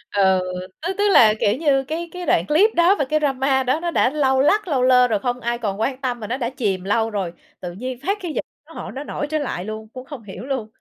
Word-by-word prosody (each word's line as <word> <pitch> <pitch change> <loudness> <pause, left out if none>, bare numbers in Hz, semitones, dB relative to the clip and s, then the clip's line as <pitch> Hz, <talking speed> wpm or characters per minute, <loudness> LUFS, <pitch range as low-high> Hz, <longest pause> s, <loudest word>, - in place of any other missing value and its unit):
Ừ, 190 -2 +4 0.5
tức 380 - -1
tức 410 - +1
là, 215 -2 +7
kiểu 205 - +2
như, 280 -4 +2
cái 325 +5 -4
cái 360 0 -6
đoạn 170 - +2
clip 360 +9 +4
đó 345 +4 +5
và 280 - +2
cái 310 +3 +1
drama 270 -2 +1
đó 260 +5 +1
nó 340 0 -2
đã 250 - +3
lâu 265 -2 +2
lắc 410 +7 +2
lâu 270 -5 +1
lơ 250 -1 +5
rồi, 215 -3 0
không 245 +3 -2
ai 235 0 -2
còn 205 -3 -3
quan 265 +3 -1
tâm, 245 -2 -2
mà 210 - -6
nó 255 - -2
đã 240 -3 -2
chìm 205 -8 -2
lâu 220 +3 +1
rồi. 195 -5 -3 0.3
Tự 175 -1 -6
nhiên 250 +7 -5
phát 405 +1 +1
cái 345 -4 -4
dịch - - -3 0.2
nó - - -14
hỏi - - -7
nó 275 +2 -6
nổi 295 - -4
trở 310 - 0
lại 240 -10 -3
luôn, 215 0 -6
cũng 255 0 -8
không 270 -5 -9
hiểu 205 +3 -9
luôn. 260 -6 -3
255 Hz, 270 wpm, -21 LUFS, 220-295 Hz, 0.5 s, là